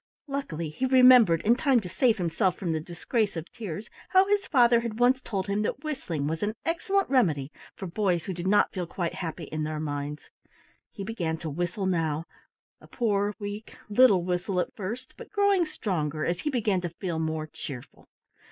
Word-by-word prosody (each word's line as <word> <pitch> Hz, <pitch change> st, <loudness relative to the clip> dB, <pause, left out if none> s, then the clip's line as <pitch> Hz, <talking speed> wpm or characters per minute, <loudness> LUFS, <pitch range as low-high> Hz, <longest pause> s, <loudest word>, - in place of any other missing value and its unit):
Luckily 175 Hz, -, -4 dB
he 260 Hz, +11 st, -1 dB
remembered, 250 Hz, -10 st, +7 dB
in 230 Hz, +3 st, +4 dB
time 265 Hz, -1 st, +3 dB
to 185 Hz, -, -7 dB
save 230 Hz, +5 st, +2 dB
himself 180 Hz, +1 st, 0 dB
from 175 Hz, -4 st, -2 dB
the 160 Hz, -, 0 dB
disgrace 195 Hz, +5 st, -2 dB
of 165 Hz, -, -4 dB
tears, 205 Hz, -2 st, -6 dB, 0.2 s
how 375 Hz, 0 st, +5 dB
his 405 Hz, 0 st, +1 dB
father 240 Hz, -4 st, +5 dB
had 230 Hz, -1 st, -4 dB
once 255 Hz, +2 st, +4 dB
told 195 Hz, -6 st, -3 dB
him 200 Hz, +1 st, -1 dB
that 265 Hz, +6 st, -2 dB
whistling 220 Hz, -, -3 dB
was 160 Hz, +2 st, -2 dB
an 210 Hz, +1 st, -1 dB
excellent 390 Hz, +4 st, +1 dB
remedy 160 Hz, -, +2 dB, 0.2 s
for 195 Hz, -, -6 dB
boys 180 Hz, -2 st, 0 dB
who 190 Hz, -, -3 dB
did 175 Hz, +1 st, -4 dB
not 205 Hz, +2 st, +4 dB
feel 180 Hz, -3 st, -3 dB
quite 170 Hz, 0 st, -3 dB
happy 165 Hz, -1 st, -5 dB
in 155 Hz, +1 st, -4 dB
their 155 Hz, 0 st, -2 dB
minds. 145 Hz, -1 st, -5 dB, 0.6 s
He 200 Hz, -, -7 dB
began 175 Hz, -7 st, -2 dB
to 160 Hz, -1 st, -5 dB
whistle 175 Hz, +5 st, -2 dB
now, 165 Hz, -4 st, 0 dB, 0.5 s
a -, -, -16 dB
poor, 205 Hz, -3 st, 0 dB
weak, 205 Hz, +2 st, -7 dB
little 205 Hz, -4 st, +5 dB
whistle 180 Hz, +1 st, -1 dB
at -, -, -2 dB
first, 230 Hz, +6 st, -6 dB
but -, -, -10 dB
growing 405 Hz, -4 st, +3 dB
stronger 160 Hz, -, -2 dB
as 175 Hz, +1 st, -1 dB
he 300 Hz, -, -2 dB
began 215 Hz, -8 st, +1 dB
to 175 Hz, -, -3 dB
feel 170 Hz, -1 st, -4 dB
more 160 Hz, -1 st, -2 dB
cheerful. 135 Hz, -4 st, -9 dB
195 Hz, 190 wpm, -27 LUFS, 165-240 Hz, 0.6 s, remembered